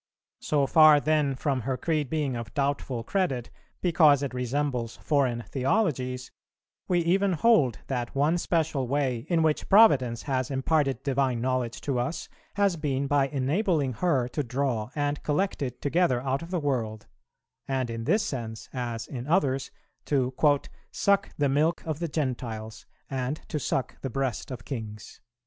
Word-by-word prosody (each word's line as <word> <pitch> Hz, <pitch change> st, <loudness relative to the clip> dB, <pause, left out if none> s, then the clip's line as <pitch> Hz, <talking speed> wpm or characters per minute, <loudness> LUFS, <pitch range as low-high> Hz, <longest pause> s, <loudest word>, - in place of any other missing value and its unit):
So 145 Hz, -2 st, +1 dB
far 155 Hz, 0 st, +7 dB
then 150 Hz, -2 st, +1 dB
from 135 Hz, -1 st, -1 dB
her 130 Hz, +3 st, -2 dB
creed 155 Hz, -4 st, -1 dB
being 150 Hz, -5 st, -1 dB
of 115 Hz, -2 st, -7 dB
doubtful 140 Hz, -4 st, -1 dB
credit 135 Hz, -7 st, -1 dB, 0.3 s
because 155 Hz, -5 st, +4 dB
it 140 Hz, -, -3 dB
resembles 125 Hz, -2 st, -2 dB
foreign 130 Hz, -6 st, 0 dB
theologies, 130 Hz, -, -1 dB, 0.6 s
we 175 Hz, -1 st, +2 dB
even 190 Hz, +3 st, +2 dB
hold 155 Hz, -, +3 dB
that 125 Hz, -2 st, -3 dB
one 150 Hz, +5 st, +2 dB
special 155 Hz, -7 st, 0 dB
way 130 Hz, -3 st, -1 dB
in 165 Hz, -2 st, +3 dB
which 155 Hz, -1 st, 0 dB
Providence 135 Hz, -, +5 dB
has 130 Hz, -3 st, -1 dB
imparted 135 Hz, -1 st, 0 dB
divine 135 Hz, -3 st, +1 dB
knowledge 125 Hz, -1 st, -1 dB
to 135 Hz, -4 st, -1 dB
us 140 Hz, +7 st, -3 dB, 0.3 s
has 200 Hz, -4 st, +2 dB
been 140 Hz, -3 st, -1 dB
by 140 Hz, -1 st, +2 dB
enabling 145 Hz, -, 0 dB
her 130 Hz, -1 st, +1 dB
to 150 Hz, -, -2 dB
draw 125 Hz, -3 st, -2 dB
and 145 Hz, 0 st, -1 dB
collect 185 Hz, +5 st, -1 dB
it 125 Hz, -3 st, -4 dB
together 145 Hz, -4 st, +2 dB
out 135 Hz, +2 st, -1 dB
of 165 Hz, -, -8 dB
the 180 Hz, -1 st, -1 dB
world, 115 Hz, -7 st, -2 dB, 0.6 s
and, 130 Hz, -3 st, -1 dB
in 115 Hz, 0 st, -5 dB
this 210 Hz, -, +2 dB
sense, 115 Hz, -4 st, -5 dB
as 120 Hz, -3 st, -3 dB
in 125 Hz, -1 st, -7 dB
others, 135 Hz, -6 st, +1 dB, 0.4 s
to 130 Hz, -3 st, 0 dB, 0.6 s
'suck 200 Hz, 0 st, +2 dB
the 145 Hz, -, +2 dB
milk 150 Hz, +5 st, +1 dB
of 155 Hz, -2 st, -3 dB
the 170 Hz, -, -1 dB
Gentiles 120 Hz, -7 st, -4 dB, 0.2 s
and 135 Hz, +2 st, -3 dB
to 150 Hz, -, -2 dB
suck 135 Hz, -1 st, -2 dB
the 135 Hz, -, -3 dB
breast 130 Hz, -3 st, -2 dB
of 125 Hz, -4 st, -7 dB
kings.' 110 Hz, -6 st, -7 dB
135 Hz, 160 wpm, -27 LUFS, 125-155 Hz, 0.6 s, far